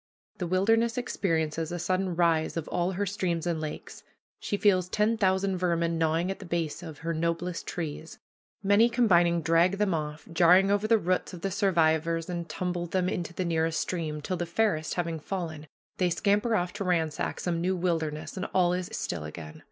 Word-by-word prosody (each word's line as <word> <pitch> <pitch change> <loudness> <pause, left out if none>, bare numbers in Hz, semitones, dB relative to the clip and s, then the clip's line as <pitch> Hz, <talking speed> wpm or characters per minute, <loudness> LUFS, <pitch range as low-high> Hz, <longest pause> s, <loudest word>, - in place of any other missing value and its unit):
The 180 - -2
wilderness 225 +6 +2
experiences 165 -9 -1
a 175 - -2
sudden 185 +1 -1
rise 165 -2 +2
of 165 - -3
all 180 +2 0
her 200 +3 -1
streams 180 -4 -2
and 170 -2 -1
lakes. 155 -1 -7 0.4
She 205 - -2
feels 185 -4 +3
ten 210 +3 +2
thousand 190 -2 +1
vermin 170 -2 0
gnawing 165 +3 +1
at 195 - -6
the 195 - -9
base 170 -1 -2
of 160 -4 -8
her 165 - 0
noblest 170 +2 -2
trees. 160 -1 -5 0.5
Many 205 +4 +5
combining 175 -8 +3
drag 165 +4 +4
them 205 -3 +1
off, 150 -1 -4
jarring 180 +3 +5
over 205 +1 +1
the 225 0 +5
roots 185 -1 -1
of 175 - -8
the 195 - -2
survivors, 165 -3 +1
and 170 -2 -4
tumble 175 +1 -3
them 180 +1 0
into 175 -4 -3
the 185 - -1
nearest 165 -1 0
stream, 155 -4 -3
till, 185 +5 -3
the 175 - -3
fairest 170 -4 0
having 170 -2 -2
fallen, 160 -3 -5 0.3
they 180 -1 +2
scamper 205 +5 +1
off 180 -3 -1
to 205 -1 -4
ransack 165 -5 -1
some 170 -2 -1
new 185 +2 +1
wilderness, 160 -3 -2
and 190 0 -3
all 180 -1 +4
is 180 +1 -3
still 85 - -3
again. 75 0 -8
175 Hz, 190 wpm, -28 LUFS, 165-190 Hz, 0.5 s, Many